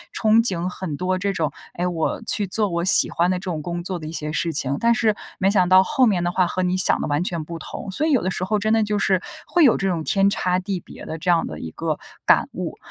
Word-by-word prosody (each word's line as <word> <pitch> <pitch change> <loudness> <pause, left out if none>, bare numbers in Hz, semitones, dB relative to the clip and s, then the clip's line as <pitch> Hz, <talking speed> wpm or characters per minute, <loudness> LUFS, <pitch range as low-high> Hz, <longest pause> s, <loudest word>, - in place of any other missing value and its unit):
憧 220 0 +3
憬 180 -5 -1
很 180 -5 -5
多 185 0 -1
这 200 +1 0
种， 155 -5 -1 0.2
哎， 175 - -2
我 165 +4 -2
去 205 -3 +1
做 210 +3 +3
我 170 0 -1
喜 185 - +5
欢 175 +2 +1
的 185 - +1
这 - - -8
种 165 -5 -3
工 175 +2 -4
作 180 -1 -4
的 155 - -7
一 - - -6
些 150 -2 -4
事 165 +1 -1
情， 140 -1 -1
但 235 0 +3
是 220 -3 +2 0.2
没 195 0 +2
想 185 -3 +3
到 185 0 +7
后 265 0 +2
面 180 -4 +1
的 175 - 0
话 180 -1 +2
和 185 - -2
你 180 0 0
想 185 - +3
的 - - -2
完 145 +4 0
全 170 -4 -3
不 165 +1 -8
同， 195 - -7
所 305 +11 0
以 - - +1
有 265 - +3
的 185 - -1
时 180 - -3
候 210 +3 0
真 215 +2 +1
的 220 -1 +3
就 210 0 -1
是， 190 -2 +1 0.3
会 345 - +3
有 260 - +5
这 195 - -1
种 170 -4 -1
天 195 +4 +2
差 180 -3 0
地 190 -1 -3
别 - - -12
的 160 - -5
这 180 - -2
样 170 -1 +3
的 80 - -7
一 80 - -6
个 - - -3 0.3
感 - - +4
悟。 - - -5
185 Hz, 305 characters per minute, -22 LUFS, 170-200 Hz, 0.3 s, 到